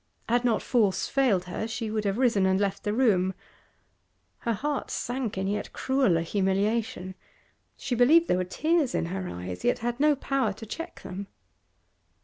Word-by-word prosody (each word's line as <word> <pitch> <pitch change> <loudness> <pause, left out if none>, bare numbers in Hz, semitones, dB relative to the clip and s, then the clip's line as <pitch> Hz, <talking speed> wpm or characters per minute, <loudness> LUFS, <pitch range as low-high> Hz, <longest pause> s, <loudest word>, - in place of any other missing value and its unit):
Had 240 +1 +2
not 235 -3 +1
force 215 -6 +2
failed 250 -10 +2
her 180 +5 -4
she 225 -1 -4
would 215 -1 -1
have 200 +1 0
risen 230 -7 +3
and 190 0 +2
left 200 -1 -1
the 205 - 0
room. 195 -6 +2 1.0
Her 235 - -1
heart 285 +6 -2
sank 245 -4 -3
in 190 - -1
yet 205 +1 -3
crueller 260 -11 +2
humiliation; 195 +1 0 0.6
she 265 - -3
believed 300 +8 +5
there - - +2
were 185 - +1
tears 305 - 0
in - - 0
her 185 +1 -4
eyes, 90 0 -6
yet - - +2
had 240 +1 -1
no 300 0 +4
power 270 -5 0
to 220 +3 -10
check 330 - -7
them. 195 +2 -6
215 Hz, 170 wpm, -27 LUFS, 190-255 Hz, 1.0 s, believed